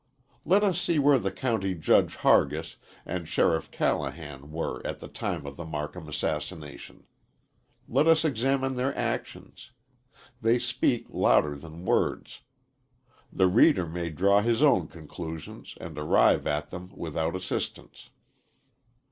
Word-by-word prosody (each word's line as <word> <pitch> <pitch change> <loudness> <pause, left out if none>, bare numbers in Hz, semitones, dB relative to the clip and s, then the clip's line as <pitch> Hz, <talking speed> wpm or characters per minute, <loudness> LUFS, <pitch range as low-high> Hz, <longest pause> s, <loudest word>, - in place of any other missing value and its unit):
Let 200 +4 +4
us 185 -4 +1
see 170 - +1
where 145 -1 +5
the 95 -3 -2
County 100 -4 -1
Judge 80 - +3
Hargis, - - +2 0.3
and 85 -3 -4
Sheriff 80 -1 +1
Callahan 75 -3 -3
were 80 +1 -3
at - - -4
the - - -9
time 70 - -4
of 70 0 -8
the 85 - -6
Marcum 75 0 -6
assassination. 75 0 -5 0.8
Let 155 - +2
us 165 0 +5
examine 135 -1 0
their 130 +2 -1
actions; 130 - -5 0.7
they 115 +2 +3
speak 120 0 0
louder 75 -1 +3
than 80 +4 -10
words. - - 0 0.9
The 95 - +2
reader 95 - +4
may 85 +1 -4
draw 100 +5 +3
his 115 +4 +1
own 95 - +4
conclusions 80 0 -9
and 80 -2 -8
arrive 75 - +3
at 75 +1 -2
them 90 0 -8
without 80 +1 -3
assistance. 95 0 -5
90 Hz, 130 wpm, -27 LUFS, 80-125 Hz, 0.9 s, where